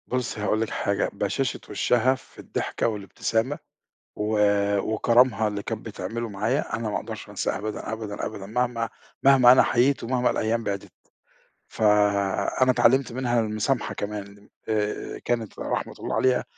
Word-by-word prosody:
بُصي 125 -3 -2
هاقول 105 +2 +1
لِك، 115 - -1
حاجة - - 0
بَشاشة - - -1
وِشَّها 125 +2 +2
في 130 - -17
الضحكة - - -2
والابتسامة 110 +5 -1 0.6
و 105 +1 -1 0.4
وكرمها 115 +2 +3
اللي 100 -1 -3
كانت 110 -2 -5
بتعمله 110 +2 -4
معايا 100 +1 -1
أنا 115 -1 -3
ما - - -3
أقدرش - - -7
أنساه - - -2
أبدًا، 105 +1 -5
أبدًا، 110 -2 -4
أبدًا 100 -2 -6
مهما 115 +1 -1 0.3
مهما 135 -3 +7
أنا 130 - +7
حَيِيت 130 +4 +2
ومهما 125 +1 +1
الأيام 115 +1 0
بعْدِت، 100 -2 -4 0.8
فأنا 105 +3 +2
اِتعلمت 125 +2 +3
منها 120 -1 0
المُسامْحة 110 +3 -1
كمان، 100 0 -6 0.2
آآ، 105 -1 -2
كانت 115 -3 -2
رحمة - - -2
الله - - -3
عليها 130 -1 +2
110 Hz, 140 wpm, -25 LUFS, 105-125 Hz, 0.8 s, مهما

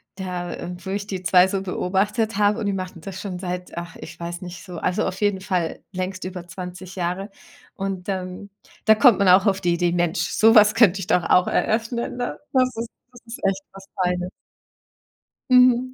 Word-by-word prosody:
Da, 180 -2 -4
äh, 180 - -6
wo - - -5
ich 200 +1 -3
die 185 -2 -5
2 180 +2 +5
so 190 0 -2
beobachtet 200 +3 -1
habe, 210 +2 +3
und 215 - -3
die 200 - 0
machten 185 -2 -5
das 190 +3 -7
schon 185 -3 -5
seit 180 -1 -5
ach, 170 -1 -6
ich - - -10
weiß 170 0 -5
nicht 175 -1 -8
so. 180 -2 -8
Also, 180 +5 0
auf 190 +3 -4
jeden 205 -2 +2
Fall 180 -3 -2
längst 185 0 -4
über 180 -2 -6
20 180 +1 -8
Jahre. 180 +3 -2 0.4
Und, 195 0 -4
ähm, 185 +1 -4 0.3
da 220 0 +6
kommt 235 -3 +6
man 200 -2 +4
auch 190 +3 +6
auf 195 -1 +2
die 175 -1 +2
Idee: 175 0 +1
„Mensch, 175 -2 0
so 215 +7 +4
was 210 -1 +7
könnte 195 -5 +4
ich 185 - -5
doch 175 - +2
auch 180 +2 +4
eröffnen, 235 +2 -1
ne?“ 245 0 -3
Das 255 -2 +2
ist 230 0 -4 0.2
das 245 - -16
ist 230 - -8
echt 195 0 0
was 195 0 -13 0.2
Feines. 180 0 -1 1.2
Mhm. 250 0 +5
190 Hz, 205 wpm, -23 LUFS, 180-210 Hz, 1.2 s, was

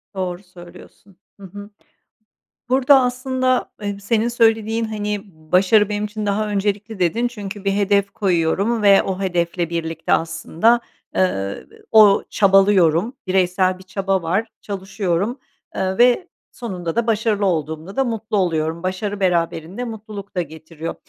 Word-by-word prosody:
Doğru 185 0 -4
söylüyorsun. 180 +2 -15 0.2
Hı 200 - -13
hı. 205 +2 -10 1.0
Burada 265 +1 +5
aslında, 255 0 0
eee, 205 -1 -3
senin 220 +2 0
söylediğin, 225 -1 +2
hani, 210 -1 -3 0.3
başarı 200 +3 +4
benim 210 0 -2
için 210 0 -5
daha 205 +1 0
öncelikli 205 +1 -2
dedin 225 +8 +1
çünkü 205 -4 -8
bir 195 - +2
hedef 200 0 +1
koyuyorum 195 +4 0
ve 200 -1 +6
o 190 -1 -3
hedefle 175 -2 -1
birlikte 165 -1 -2
aslında, 170 +8 +1 0.3
eee, 95 +1 -1 0.3
o 215 -3 +6
çabalıyorum, 195 0 +4
bireysel 185 0 +1
bir - - -13
çaba 190 0 -1
var, 190 +7 -1
çalışıyorum, 195 +3 -2 0.4
eee, 190 +1 -1
ve 245 +9 +4 0.2
sonunda 180 -8 -5
da 235 0 0
başarılı 215 -2 +1
olduğumda 160 +1 -2
da 270 - +2
mutlu 225 -3 -2
oluyorum. 165 -2 -1
Başarı 200 +2 -3
beraberinde 175 +2 -1
mutluluk 210 -4 -8
da 180 - +1
getiriyor. 160 +1 -7
200 Hz, 135 wpm, -20 LUFS, 180-220 Hz, 1.0 s, ve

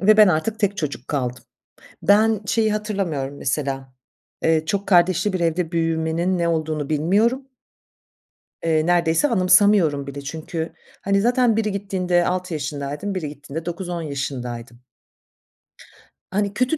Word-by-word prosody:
ve 215 +2 +5
ben 210 -2 +8
artık 180 +7 0
tek 200 -1 +1
çocuk 145 -6 -4
kaldım. 125 -4 -2 0.6
Ben 215 +1 +4
şeyi 220 -2 +2
hatırlamıyorum, 180 -10 -3
mesela, 135 -1 -3 0.5
eee, 160 -1 +2
çok 200 +1 -2
kardeşli 185 +2 +3
bir 185 - -1
evde 170 0 0
büyümenin 165 +2 0
ne 170 - +1
olduğunu 155 -3 -1
bilmiyorum. 210 - +1 1.2
Eee, 160 -1 +2
neredeyse 175 - +3
anımsamıyorum 185 - +4
bile. 140 0 -6
Çünkü, 160 +3 -5 0.3
hani, 195 0 +2
zaten 245 -1 +3
biri 215 -2 0
gittiğinde 185 -3 0
6 180 -1 -2
yaşındaydım 145 +6 -4
biri 155 -5 -3
gittiğinde 145 +2 -8
9-10 175 -1 -4
yaşındaydım. 125 -5 -5 1.5
Hani, 200 0 0
kötü 255 +8 +1
170 Hz, 130 wpm, -22 LUFS, 150-200 Hz, 1.5 s, ben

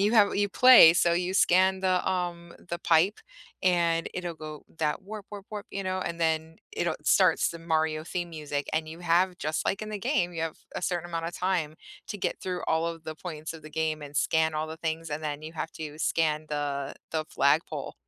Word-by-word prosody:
you 205 +3 +3
have 210 -3 +5
you 205 0 +1
play, 250 -9 +9
so 170 -1 +3
you 180 +1 0
scan 190 0 +4
the, 185 -1 +1
um, 175 -2 -3 0.2
the 170 - -3
pipe, 170 +5 +3 0.4
and 170 -2 +2
it'll 175 -2 -4
go 155 -1 -9
that 155 +3 0
warp 210 0 -8
warp 205 -1 -9
warp, 210 -1 -6
you 195 - -3
know, 185 0 -1
and 170 -2 -4
then 160 0 0 0.2
it'll 170 -2 -1
starts 185 0 +4
the 170 - -8
Mario 160 -1 0
theme 175 0 -4
music 150 -2 -4
and 155 0 -1
you 160 +1 -8
have- 175 +2 +2
just 155 +1 -2
like 195 - 0
in 215 - -5
the 210 -1 -4
game- 175 -2 0
you 165 - -5
have 165 -1 -3 0.2
a - - -4
certain 175 -1 -1
amount 165 -1 -3
of 170 - -4
time 175 -5 -1 0.3
to 205 - -5
get - - -2
through 180 -1 -3
all 160 +1 +1
of 165 -1 -5
the 155 0 -5
points 160 -2 -6
of 165 - -11
the 155 - -11
game 155 0 -1
and 145 0 -8
scan 160 0 +2
all 155 +1 -1
the 160 0 -7
things 160 0 -3
and 150 +1 -3
then 150 -1 -4
you 155 +1 -7
have 165 0 -4
to 155 -2 -7
scan 155 -1 +1
the 145 -2 -3 0.2
the 155 -1 0
flagpole - - +1
165 Hz, 220 wpm, -28 LUFS, 155-180 Hz, 0.4 s, play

